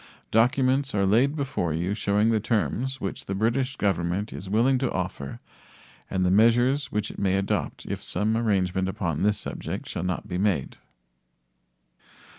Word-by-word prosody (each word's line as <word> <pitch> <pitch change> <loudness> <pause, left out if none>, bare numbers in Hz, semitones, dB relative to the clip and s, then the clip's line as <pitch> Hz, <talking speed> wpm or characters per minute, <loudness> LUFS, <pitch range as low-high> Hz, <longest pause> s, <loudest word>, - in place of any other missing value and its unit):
Documents 130 +4 +2
are 100 -1 +2
laid 120 +9 +3
before 130 - -1
you 90 +4 -1
showing 105 +1 +2
the 110 -1 +2
terms 120 +4 -1
which 100 - -5
the 95 - -2
British 125 +6 0
Government 95 0 -1
is 95 - -7
willing 120 +6 +3
to 130 -1 0
offer 90 -7 -4 0.7
and 95 -1 0
the 90 - +3
measures 120 +6 +3
which 105 0 -1
it - - -10
may 95 -1 +2
adopt 95 0 -2
if - - -4
some 110 +2 0
arrangement 95 -4 +1
upon 85 -5 -2
this 105 +1 +2
subject - - -5
shall - - -4
not 90 0 -3
be 90 -1 -3
made. 95 -9 0
105 Hz, 160 wpm, -26 LUFS, 95-120 Hz, 0.7 s, laid